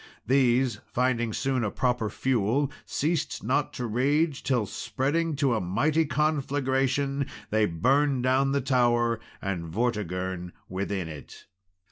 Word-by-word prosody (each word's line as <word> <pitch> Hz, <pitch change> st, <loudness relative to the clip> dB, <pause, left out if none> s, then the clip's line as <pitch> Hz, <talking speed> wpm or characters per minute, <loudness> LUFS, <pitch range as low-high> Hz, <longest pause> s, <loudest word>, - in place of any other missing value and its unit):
These 125 Hz, -3 st, +3 dB
finding 120 Hz, -2 st, +1 dB
soon 130 Hz, +2 st, 0 dB
a 110 Hz, -, 0 dB
proper 125 Hz, -1 st, 0 dB
fuel, 130 Hz, +5 st, 0 dB, 0.2 s
ceased 160 Hz, +1 st, -1 dB
not -, -, +1 dB
to 125 Hz, -, -4 dB
rage, 140 Hz, +6 st, +1 dB
till 125 Hz, -5 st, +1 dB
spreading 150 Hz, -, -1 dB
to 135 Hz, -3 st, +2 dB
a 110 Hz, -, 0 dB
mighty 150 Hz, -, +1 dB
conflagration, 140 Hz, -1 st, 0 dB, 0.2 s
they 110 Hz, 0 st, +3 dB
burned 130 Hz, -, +2 dB
down 130 Hz, +2 st, +3 dB
the 140 Hz, 0 st, +1 dB
tower 120 Hz, -3 st, +2 dB, 0.2 s
and 90 Hz, -4 st, -3 dB
Vortigern 95 Hz, -3 st, -2 dB
within 95 Hz, -1 st, -3 dB
it. 75 Hz, -3 st, -10 dB
125 Hz, 125 wpm, -27 LUFS, 105-140 Hz, 0.2 s, These